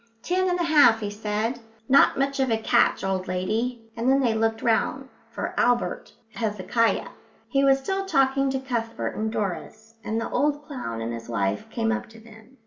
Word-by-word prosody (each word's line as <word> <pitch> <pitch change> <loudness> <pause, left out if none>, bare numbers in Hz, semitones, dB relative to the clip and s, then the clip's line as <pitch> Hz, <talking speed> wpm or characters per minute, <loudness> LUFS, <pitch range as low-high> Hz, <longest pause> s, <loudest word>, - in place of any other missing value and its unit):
"Ten 370 +1 +1
and 355 0 0
a - - +1
half," 295 -9 +5
he 205 -1 -3
said, 215 +3 -2 0.3
"not 275 - +5
much 275 +1 0
of 265 -1 +2
a 225 - +2
catch, 220 - +2
old 190 -1 -1
lady," 225 +6 -2
and 235 +2 0
then 270 +1 +4
they 240 -4 +2
looked 225 0 0
round 255 +4 0 0.2
for - - -4
Albert 245 0 0 0.2
Hezekiah. 225 +1 0 0.4
He 275 -1 +2
was 270 -1 +5
still 385 +8 -3
talking 270 -3 +2
to 265 0 -1
Cuthbert 235 -3 -3
and 220 0 -2
Doris, 215 +3 -5
and 225 0 -2
the 230 - -3
old 295 0 0
clown 180 - -5
and 115 +1 -3
his 115 0 -8
wife 100 -3 -1
came 225 -1 -1
up 235 - -3
to 225 0 -15
them. 225 +3 -17
230 Hz, 190 wpm, -25 LUFS, 215-270 Hz, 0.4 s, half